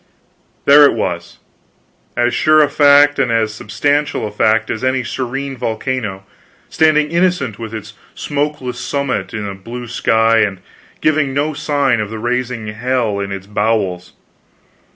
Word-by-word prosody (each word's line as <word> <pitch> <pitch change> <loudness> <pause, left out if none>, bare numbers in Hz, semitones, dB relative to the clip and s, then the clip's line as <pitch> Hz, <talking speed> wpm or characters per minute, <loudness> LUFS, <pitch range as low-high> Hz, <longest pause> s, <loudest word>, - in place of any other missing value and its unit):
There 145 +1 +8
it 140 - +3
was, 85 -6 -4 0.8
as 120 0 +2
sure 155 0 +4
a 145 - +1
fact 145 0 +5
and 120 - +1
as 110 -2 +1
substantial 145 +9 -1
a 105 - -5
fact 110 +1 +1
as 110 - -4
any 130 0 +1
serene 135 +3 -4
volcano, 115 -4 -3 0.5
standing 155 -1 +2
innocent 170 - 0
with 115 -2 -6
its 110 -2 -8 0.2
smokeless 145 -4 -3
summit 130 -11 -2
in 105 -1 -4
the 100 - -4
blue 115 +6 -8
sky 115 -1 +2
and 100 -3 +1 0.4
giving 145 -3 +1
no 150 +2 0
sign 140 -4 0
of 105 -1 -3
the 110 - -6
rising 120 0 -2
hell 115 -1 -1
in 100 0 -4
its 95 -1 -6
bowels. 105 -3 -1
120 Hz, 150 wpm, -17 LUFS, 110-140 Hz, 0.8 s, There